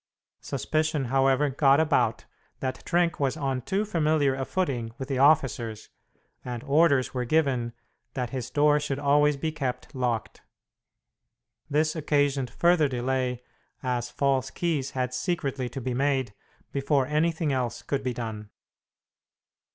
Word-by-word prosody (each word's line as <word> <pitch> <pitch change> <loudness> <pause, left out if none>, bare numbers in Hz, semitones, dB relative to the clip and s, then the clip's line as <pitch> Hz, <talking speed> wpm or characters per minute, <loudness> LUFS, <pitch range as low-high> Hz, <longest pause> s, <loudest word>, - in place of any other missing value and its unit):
Suspicion, 155 -2 -1
however, 135 +1 +3
got 140 +1 +4
about 125 -8 +1 0.3
that 130 -1 -4
Trenck 175 -1 +1
was 140 +1 0
on 135 -4 -1
too 195 - -1
familiar 155 -7 +2
a 135 0 -3
footing 125 -12 -2
with 135 +1 -6
the 135 -2 -1
officers, 130 -6 +2 0.5
and 120 -1 -5
orders 145 -2 +3
were 125 -1 -1
given 125 -4 +1 0.4
that 125 -3 -2
his 130 -3 -4
door 150 0 +3
should 145 -2 -2
always 145 0 +3
be 155 +3 -2
kept 135 -5 -4
locked. 125 -4 -2 1.3
This 155 +2 +1
occasioned 145 -4 +1
further 170 +4 +3
delay, 125 -1 -1 0.4
as 125 -1 -1
false 135 -2 0
keys 150 -4 -1
had 125 0 -1
secretly 135 -4 -2
to 135 - -6
be 125 0 -3
made 135 -3 0 0.4
before 140 -1 +1
anything 155 +1 0
else 125 -3 -2
could 140 -1 -2
be 130 - -1
done. 110 -3 -5
135 Hz, 135 wpm, -27 LUFS, 125-150 Hz, 1.3 s, got